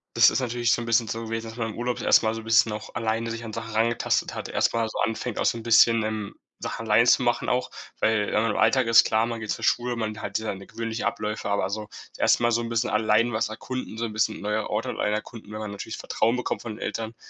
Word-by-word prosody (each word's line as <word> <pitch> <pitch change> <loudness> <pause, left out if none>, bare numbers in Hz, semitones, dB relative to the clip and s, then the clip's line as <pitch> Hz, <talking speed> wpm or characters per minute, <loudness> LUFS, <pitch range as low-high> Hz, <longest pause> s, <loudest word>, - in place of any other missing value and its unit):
Das - - +7
ist 110 - 0
natürlich 120 -1 0
so - - +2
'n 115 - -5
bisschen 115 0 +2
so 115 +1 -4
gewesen, 115 0 -4
dass 115 - -11
man 115 -2 -2
im - - -11
Urlaub 120 0 -2
erst - - +5
mal 110 0 0
so 115 - -6
bisschen 115 0 +4
auch 105 0 -7
alleine 115 0 -1
sich 115 0 -5
an 115 - -6
Sachen 115 +1 -6
rangetastet 115 +1 +1
hat, - - -5
erst - - +1
mal 115 -1 +1
so 110 - -6
anfängt, 110 +2 -2
auch - - 0
so - - +2
'n 115 - -8
bisschen, 115 0 +5
ähm, 110 -2 -4 0.2
Sachen 115 - -5
allein 115 +3 +5
zu 125 - +5
machen 120 -1 0
auch. 125 0 0 0.3
Weil, 110 -2 +2
äh, 110 +2 +2
im 105 - -1
Alltag 130 -2 +3
ist 115 +1 +6
klar, 110 +1 +2
man 115 -1 -4
geht 110 -1 -7
zur - - -3
Schule, 120 0 +1
man 110 -1 -4
hat 100 - -2
seine 100 -3 -5
gewöhnliche 115 0 -3
Abläufe, 105 -1 -3
aber 100 -2 +1
so 105 0 -4 0.2
das - - -16
1. - - +3
Mal 120 - +3
so 120 0 +1
'n 115 - -4
bisschen 115 +1 0
allein 110 +2 +2
was 110 0 0
erkunden, 115 +1 -6
so 115 - -1
'n 110 - -5
bisschen 110 0 0
neue 105 +1 -2
Orte 105 +2 -2
allein 105 - -1
erkunden, 110 0 -6
wenn 110 - -6
man 105 -1 -5
natürlich 100 +2 -6
Vertrauen 115 +2 0
bekommt 125 - -3
von 115 - -6
den - - -13
Eltern, 115 0 -4
115 Hz, 270 wpm, -25 LUFS, 110-115 Hz, 0.3 s, Das